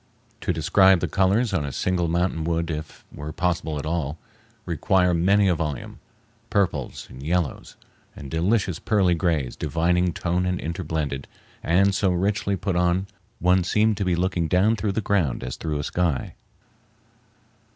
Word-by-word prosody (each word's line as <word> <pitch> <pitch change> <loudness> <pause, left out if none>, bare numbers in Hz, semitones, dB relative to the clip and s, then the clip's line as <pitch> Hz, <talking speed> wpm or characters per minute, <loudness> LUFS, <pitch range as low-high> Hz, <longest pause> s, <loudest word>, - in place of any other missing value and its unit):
To - - -1
describe 95 +3 +4
the - - -1
colors 100 +4 +2
on 85 -6 +1
a 70 - -4
single 90 +3 0
mountain 85 -1 0
would, 85 0 -1
if 75 0 -7
it - - -14
were 75 +1 -5
possible 85 -2 -1
at 70 - -5
all, 80 -2 -2 0.5
require 90 -2 +2
many 95 +4 +3
a 90 - +4
volume—purples, 100 - -4
and 65 - -10
yellows, 85 0 -2 0.4
and 70 - -9
delicious 90 +1 +1
pearly 100 -5 +2
grays 80 -7 0
divinely 90 +2 +1
toned 90 +2 -1
and 90 0 -1
interblended, 80 -5 -3 0.3
and 95 +4 +3
so 95 0 +1
richly 100 +2 0
put 95 -1 -2
on 90 +2 +2 0.3
one 90 +1 +3
seemed 105 +4 +2
to 100 - -1
be 90 -2 +1
looking 85 -1 0
down 95 +7 +3
through 100 -1 -2
the 110 - -1
ground 90 - 0
as 65 0 -4
through 80 -2 -3
a 75 - -3
sky. 85 -4 -1
90 Hz, 160 wpm, -24 LUFS, 80-95 Hz, 0.5 s, describe